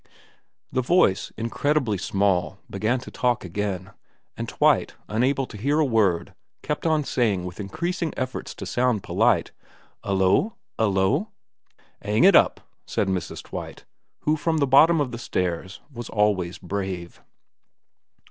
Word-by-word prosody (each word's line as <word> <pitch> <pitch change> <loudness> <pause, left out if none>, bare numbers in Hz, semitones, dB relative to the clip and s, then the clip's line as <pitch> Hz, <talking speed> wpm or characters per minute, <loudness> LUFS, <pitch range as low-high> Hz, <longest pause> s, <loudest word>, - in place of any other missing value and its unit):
The 130 - +1
voice, 125 - +2
incredibly 115 -1 0
small, 95 -2 0
began 110 +6 0
to - - -10
talk 120 -4 0
again, 95 +1 -3 0.4
and - - -5
Twite, - - +2
unable 130 +5 +1
to 115 - -11
hear 140 +8 +1
a 155 - +4
word, 100 -9 +1 0.3
kept 150 +2 -2
on 155 -2 +2
saying 105 -9 0
with 90 +2 -8
increasing 170 - -2
efforts 130 -1 -4
to - - -7
sound 125 -5 +1
polite, - - +2 0.3
' - - -33
'Ullo? 100 - +2 0.2
'Ullo? 110 - +2 0.2
' - - -46
' - - -34
'Ang 105 +3 +1
it 195 - +7
up,' - - +4 0.3
said 95 - 0
Mrs. 95 -2 -3
Twite, - - -8 0.4
who 155 - +2
from 160 +1 0
the 145 - +3
bottom 155 +5 +6
of 140 -4 0
the 120 - -6
stairs 90 -3 -3
was 120 -2 -7
always 100 -5 +1
brave. 95 -2 -5
110 Hz, 145 wpm, -24 LUFS, 95-140 Hz, 0.4 s, it